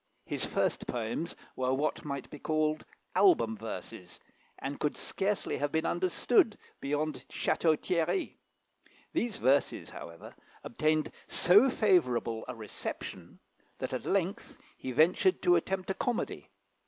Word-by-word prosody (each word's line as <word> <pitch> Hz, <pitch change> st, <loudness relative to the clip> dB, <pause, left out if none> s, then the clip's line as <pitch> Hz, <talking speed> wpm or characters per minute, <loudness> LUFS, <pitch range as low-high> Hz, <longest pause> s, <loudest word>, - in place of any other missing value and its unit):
His -, -, -3 dB
first -, -, 0 dB
poems 120 Hz, +8 st, -3 dB, 0.2 s
were 130 Hz, 0 st, +1 dB
what 150 Hz, +3 st, -1 dB
might 140 Hz, -2 st, -4 dB
be 150 Hz, -, -8 dB
called 155 Hz, 0 st, 0 dB, 0.3 s
album 170 Hz, -, +5 dB
verses, 110 Hz, -3 st, -8 dB, 0.4 s
and 140 Hz, +1 st, -5 dB
could 150 Hz, -, -1 dB
scarcely 200 Hz, +1 st, -1 dB
have 145 Hz, 0 st, -1 dB
been 160 Hz, +1 st, 0 dB
understood 185 Hz, +6 st, +2 dB, 0.2 s
beyond 150 Hz, +1 st, -2 dB
Château 160 Hz, -2 st, +2 dB
Thierry. 175 Hz, -, 0 dB, 0.7 s
These 235 Hz, -3 st, -1 dB
verses, 135 Hz, +2 st, +2 dB
however, 85 Hz, 0 st, -10 dB, 0.3 s
obtained 155 Hz, +4 st, +1 dB, 0.2 s
so 205 Hz, +10 st, +6 dB
favourable 125 Hz, -, +2 dB
a 125 Hz, -, -5 dB
reception, 110 Hz, -3 st, -6 dB, 0.4 s
that -, -, -4 dB
at -, -, -3 dB
length -, -, -1 dB, 0.2 s
he 130 Hz, -, -5 dB
ventured 170 Hz, -, +4 dB
to 355 Hz, 0 st, +6 dB
attempt 190 Hz, -, -1 dB
a -, -, +1 dB
comedy. 245 Hz, +3 st, -2 dB
155 Hz, 130 wpm, -31 LUFS, 130-185 Hz, 0.7 s, so